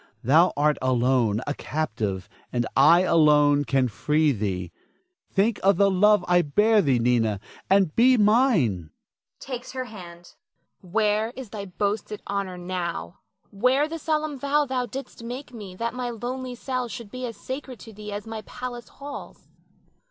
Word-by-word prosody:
Thou 160 +9 +5
art 150 +1 +2
alone, 125 -4 +2
a 145 - -1
captive, 110 -13 -3 0.2
and 120 -1 0
I 170 +1 +6
alone 150 -4 +4
can 135 -2 +2
free 150 +7 +1
thee. 95 -6 -3 0.6
Think 210 +3 +1
of 195 -1 +4
the 200 0 +4
love 205 0 +4
I 175 0 +4
bear 210 +8 +3
thee, 135 -8 +2
Nina, 115 -4 +1 0.3
and 190 -5 +3
be 255 +2 +5
mine 205 - +3 0.5
[takes 255 -2 -7
her 255 -1 -3
hand]. 175 -6 -12 0.5
Nina. 180 - -16
Where 215 +1 +2
is 255 -5 -8
thy 205 -2 -5
boasted 205 +2 -3
honor 195 -2 -3
now? 175 - -4 0.3
Where 255 +8 +2
the 330 +1 -6
solemn 305 -3 -1
vow 290 +2 +2
thou 255 -2 -2
didst 265 -3 -8
make 250 +3 -7
me 200 -5 -9
that 230 +4 -3
my 250 -1 -3
lonely 250 +2 -5
cell 255 0 -3
should 220 -1 -8
be 255 0 -4
as 230 -3 -8
sacred 260 -1 -6
to 225 - -11
thee 210 0 -8
as 205 0 -5
my 225 -1 -6
palace 245 +1 -7
halls? 285 0 -10
200 Hz, 160 wpm, -25 LUFS, 150-245 Hz, 0.6 s, I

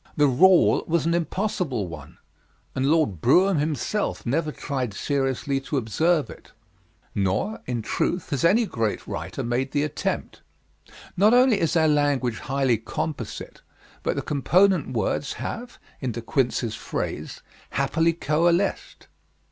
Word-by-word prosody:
The 150 - +5
rule 175 +7 +5
was 165 0 +1
an 165 - +2
impossible 170 - -1
one, 80 -4 -10 0.6
and 130 +1 0
Lord 150 - +1
Brougham 180 +6 +4
himself 155 +7 -2
never 150 +5 0
tried 130 -8 -4
seriously 135 0 -1
to 140 +2 -3
observe 150 - +1
it; - - -13 0.6
nor, 100 - -1
in 120 -3 -2
truth, 175 - -2
has 140 - -1
any 210 +8 +4
great 115 - -2
writer - - -5
made 125 +3 -1
the 145 0 +2
attempt. 150 0 -3 0.7
Not 210 +6 +5
only 250 -4 +5
is 165 - +1
our 160 -1 +4
language 145 -6 +1
highly 135 -5 0
composite, 115 +1 -5 0.4
but - - -1
the - - -2
component 175 +3 +2
words 125 +4 -1
have, 240 +1 -6 0.2
in 130 -4 -3
De 115 - -5
Quincey's 120 -2 0
phrase, - - -5 0.3
'happily 160 +4 +1
coalesced.' 170 +4 0
145 Hz, 135 wpm, -24 LUFS, 125-170 Hz, 0.7 s, The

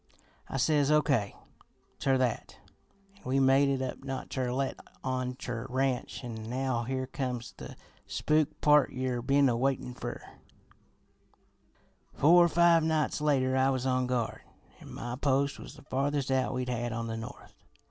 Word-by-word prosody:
"I - - -3
says 145 +1 +2
O. 150 0 +4
K. 115 -9 0 0.6
ter 135 -1 +2
that, 125 -3 -2 0.6
an' - - -22
we 130 +2 +1
made 135 +1 +4
it 135 -1 0
up 130 +1 -5
not 135 -1 -5
ter 130 -2 -1
let 135 +1 -1 0.3
on 130 -1 -2
ter 120 -2 -5
Ranch; 130 0 -1
an' 110 -2 -6
now 125 -1 -1
here 130 +1 -2
comes 125 -2 -4
the - - -9 0.3
spook 155 0 0
part 150 -1 +5
yer 130 -2 -2
been 140 +2 +3
a 120 - +2
waitin' 130 0 -1
fer. - - -6 1.9
"Four 175 +4 +6
or - - +1
five 170 0 +5
nights 155 -2 0
later 130 -3 +2
I 130 0 +3
was 130 -1 -1
on 130 -1 +1
guard, 125 -3 -2 0.4
an' - - -12
my 120 +1 -5
post 140 0 +1
was - - -10
the 150 - -15
farthest 140 0 -1
out 130 0 +1
we 125 0 -1
had 120 -1 -2
on 115 0 -3
the 115 -1 -4
north. 110 - -9
130 Hz, 170 wpm, -30 LUFS, 125-140 Hz, 1.9 s, Four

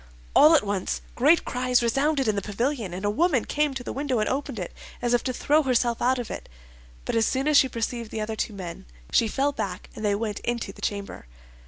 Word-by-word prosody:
All 310 +2 +8
at 305 - +4
once 200 -2 -2
great 295 +7 +4
cries 250 0 +1
resounded 270 +3 +1
in 215 - +2
the 200 - -1
pavilion, 225 +1 -2
and 185 +3 -5
a - - +2
woman 290 -1 +2
came 295 -2 0
to 255 - -4
the - - -5
window, 275 -2 -1
and 215 - +1
opened 265 -3 -2
it, 180 -3 -5 0.3
as 240 0 0
if 240 - +3
to 260 - 0
throw 295 +5 +2
herself 245 -4 +1
out 255 +2 +3
of 245 -2 -5
it; - - -7 0.6
but - - -2
as 225 -1 +3
soon 265 +2 0
as 305 - +3
she 265 -2 +6
perceived 230 -1 -3
the 220 - -5
other 220 +1 -3
two 215 - -2
men, 175 - -8 0.2
she 230 - +4
fell 275 +6 +1
back 195 -8 -5
and 215 - -7
they 205 -1 +2
went 210 -1 -3
into 235 -5 -3
the - - -15
chamber. 200 - -4
240 Hz, 235 wpm, -25 LUFS, 210-270 Hz, 0.6 s, All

